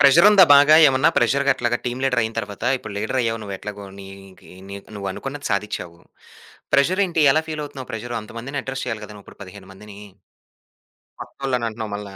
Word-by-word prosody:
ప్రెజరుందా 175 Hz, +8 st, +7 dB
బాగా 145 Hz, +2 st, +7 dB
ఏమన్నా, 130 Hz, 0 st, +3 dB
ప్రెజరుగట్లాగా 130 Hz, -1 st, +1 dB
టీమ్ 125 Hz, +1 st, -3 dB
లీడరయిన 120 Hz, -4 st, 0 dB
తర్వాతా? 100 Hz, +1 st, -3 dB
ఇప్పుడు 110 Hz, -5 st, -9 dB
లీడరయ్యావు 115 Hz, +2 st, -1 dB
నువ్వు 100 Hz, -1 st, -6 dB
ఎట్లాగో, 105 Hz, 0 st, -8 dB
నీదీ 95 Hz, -1 st, -13 dB, 0.2 s
నీక్ 100 Hz, 0 st, -10 dB
నువ్వనుకున్నది 135 Hz, +9 st, -5 dB
సాధిచ్చావు. 100 Hz, -4 st, -4 dB, 0.7 s
ప్రెజరేంటి, 170 Hz, +2 st, +2 dB
ఎలా 155 Hz, -, +1 dB
ఫీలవుతున్నావు 145 Hz, -4 st, -7 dB
ప్రెజరు 120 Hz, +2 st, -5 dB
అంతమందిని 120 Hz, +6 st, -6 dB
అడ్రెస్ 135 Hz, -1 st, -5 dB
చెయ్యాలి 115 Hz, -3 st, -5 dB
గదా 105 Hz, -, -11 dB
నువ్విప్పుడు 100 Hz, -, -16 dB
15 95 Hz, 0 st, -12 dB
మందినీ? 100 Hz, +1 st, -13 dB, 1.2 s
కొత్తోళ్ళనంటన్నావు 115 Hz, -5 st, -4 dB
మళ్ళా. 100 Hz, -1 st, -8 dB
115 Hz, 140 wpm, -21 LUFS, 100-140 Hz, 1.2 s, ప్రెజరుందా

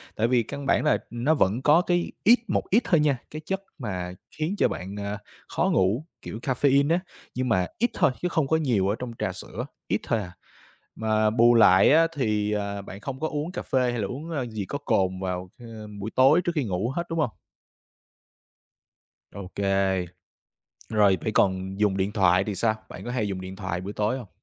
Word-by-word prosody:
Tại 115 Hz, +2 st, +1 dB
vì 120 Hz, -2 st, +3 dB
căn 140 Hz, +5 st, -7 dB
bản -, -, +2 dB
là, 150 Hz, -, +3 dB, 0.2 s
ừm, 120 Hz, 0 st, -6 dB
nó 155 Hz, +3 st, +4 dB
vẫn 115 Hz, -3 st, +1 dB
có 150 Hz, +5 st, +5 dB
cái 175 Hz, -1 st, 0 dB
ít, 235 Hz, +4 st, +6 dB
một -, -, 0 dB
ít 225 Hz, +6 st, +4 dB
thôi 170 Hz, -4 st, +3 dB
nha, 145 Hz, -4 st, +2 dB
cái 155 Hz, -, -6 dB
chất 195 Hz, 0 st, -3 dB
mà 90 Hz, -, -4 dB, 0.2 s
khiến 160 Hz, +6 st, -1 dB
cho -, -, +4 dB
bạn, 95 Hz, +3 st, -6 dB
a, 100 Hz, 0 st, -3 dB, 0.3 s
khó -, -, 0 dB
ngủ, 105 Hz, +11 st, +2 dB, 0.2 s
kiểu 110 Hz, -, -7 dB
caffeine 140 Hz, +3 st, +2 dB
á, 170 Hz, -, +3 dB, 0.4 s
nhưng 130 Hz, -1 st, -1 dB
mà 95 Hz, -5 st, +2 dB
ít 240 Hz, +2 st, +2 dB
thôi -, -, +3 dB
chứ 180 Hz, -, 0 dB
không 160 Hz, -4 st, 0 dB
có 160 Hz, -, +3 dB
nhiều 120 Hz, -11 st, +1 dB
ở 105 Hz, -, +1 dB
trong 125 Hz, -2 st, -5 dB
trà 95 Hz, -, -1 dB
sữa, 110 Hz, +6 st, -7 dB, 0.2 s
ít 100 Hz, -, 0 dB
thôi 115 Hz, -, 0 dB
à. 90 Hz, -4 st, -6 dB, 0.7 s
Mà 110 Hz, -1 st, +2 dB
bù 120 Hz, +2 st, +5 dB
lại 95 Hz, -4 st, +6 dB
á, 165 Hz, +2 st, +6 dB
thì, 105 Hz, -5 st, 0 dB
à, 100 Hz, -1 st, -3 dB
bạn 100 Hz, 0 st, -10 dB
không 130 Hz, +3 st, -6 dB
có 160 Hz, -, -1 dB
uống 150 Hz, +2 st, -3 dB
cà -, -, -4 dB
phê 125 Hz, -2 st, +1 dB
hay 120 Hz, -2 st, -2 dB
là 100 Hz, -, -1 dB
uống, 145 Hz, +9 st, -7 dB
a, 135 Hz, -6 st, -2 dB
gì 110 Hz, -4 st, -5 dB
có 145 Hz, -, -4 dB
cồn 95 Hz, -9 st, 0 dB
vào, 90 Hz, -1 st, -4 dB
ơ, 120 Hz, -, -11 dB, 0.3 s
buổi 105 Hz, +3 st, -5 dB
tối 135 Hz, +7 st, +6 dB
trước 175 Hz, -, -1 dB
khi 150 Hz, -, +1 dB
ngủ 100 Hz, +1 st, -1 dB
hết, 170 Hz, -, -1 dB
đúng 165 Hz, -, -2 dB
hông? 150 Hz, -, +2 dB, 2.0 s
Ô 100 Hz, -2 st, -8 dB
kê. 95 Hz, -2 st, +1 dB, 0.8 s
Rồi, 105 Hz, -3 st, +4 dB
vậy 110 Hz, -, -1 dB
còn 95 Hz, 0 st, +1 dB
dùng 105 Hz, -2 st, +2 dB
điện 95 Hz, +2 st, 0 dB
thoại 95 Hz, -2 st, +3 dB
thì 105 Hz, -2 st, -4 dB
sao? 110 Hz, +3 st, +1 dB
Bạn -, -, -9 dB
có 120 Hz, -, -4 dB
hay 110 Hz, -5 st, -1 dB
dùng 95 Hz, -2 st, -4 dB
điện 95 Hz, +1 st, -7 dB
thoại 95 Hz, -3 st, -4 dB
buổi 100 Hz, +2 st, -6 dB
tối 105 Hz, +5 st, 0 dB
hông? 120 Hz, -6 st, -9 dB
110 Hz, 220 wpm, -26 LUFS, 95-140 Hz, 2.0 s, ít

